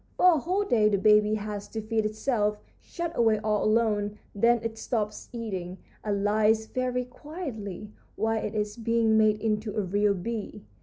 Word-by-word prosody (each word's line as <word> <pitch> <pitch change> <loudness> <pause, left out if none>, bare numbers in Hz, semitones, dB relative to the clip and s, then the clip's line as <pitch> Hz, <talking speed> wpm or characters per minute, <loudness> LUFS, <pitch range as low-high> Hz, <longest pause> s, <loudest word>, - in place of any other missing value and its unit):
For 360 -1 +6
a 315 - +1
whole 370 +8 0
day 220 - +3
the 200 - +2
baby 210 +1 +4
has 210 -1 -5
to 225 - -5
feed 220 0 0
itself, 215 -1 0 0.2
shut 340 -1 -5
away 225 -2 +3
all 210 -1 +1
alone; 210 -2 +1 0.2
then 235 +4 +3
it 225 -1 -4
stops 215 -3 -3
eating, 190 -6 -5 0.3
and 200 -2 -1
lies 215 +1 +3
very 250 +1 -2
quietly 245 - -7 0.2
while 225 0 0
it 210 - -4
is 210 0 -2
being 230 -1 +2
made 215 -1 +4
into 215 -1 -1
a - - +2
real 200 +2 +1
bee. 220 +3 -5
215 Hz, 170 wpm, -27 LUFS, 210-230 Hz, 0.3 s, For